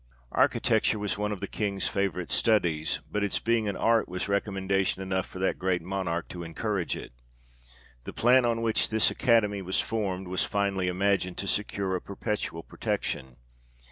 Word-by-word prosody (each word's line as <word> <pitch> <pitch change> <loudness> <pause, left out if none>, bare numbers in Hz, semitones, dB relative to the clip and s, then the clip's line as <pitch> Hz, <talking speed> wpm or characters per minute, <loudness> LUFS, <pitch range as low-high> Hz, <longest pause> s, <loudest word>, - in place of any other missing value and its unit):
Architecture - - +2
was 105 -1 -1
one 105 +1 -2
of 100 - -4
the - - -3
King's 100 -2 -1
favourite 100 -4 -1
studies; 85 -9 +2
but 105 - 0
its 100 - 0
being 115 -2 +1
an 100 - -1
art 115 -3 +2
was 90 +2 -3
recommendation 95 -1 0
enough 95 0 -1
for - - -10
that 95 +1 0
great 90 -2 0
Monarch 90 -2 -2
to 90 - -7
encourage 90 +2 -2
it. - - -9 0.9
The - - -5
plan 125 +2 +4
on 115 -1 +1
which 115 -1 +2
this 110 -1 +4
Academy 105 -5 +2
was 95 0 0
formed, 95 -4 -2
was 90 +1 0
finely 100 -2 0
imagined 90 0 +1
to 100 - -3
secure 100 -2 0
a 90 - -2
perpetual 100 -5 -4
protection. 65 -2 -3
100 Hz, 170 wpm, -28 LUFS, 90-105 Hz, 0.9 s, plan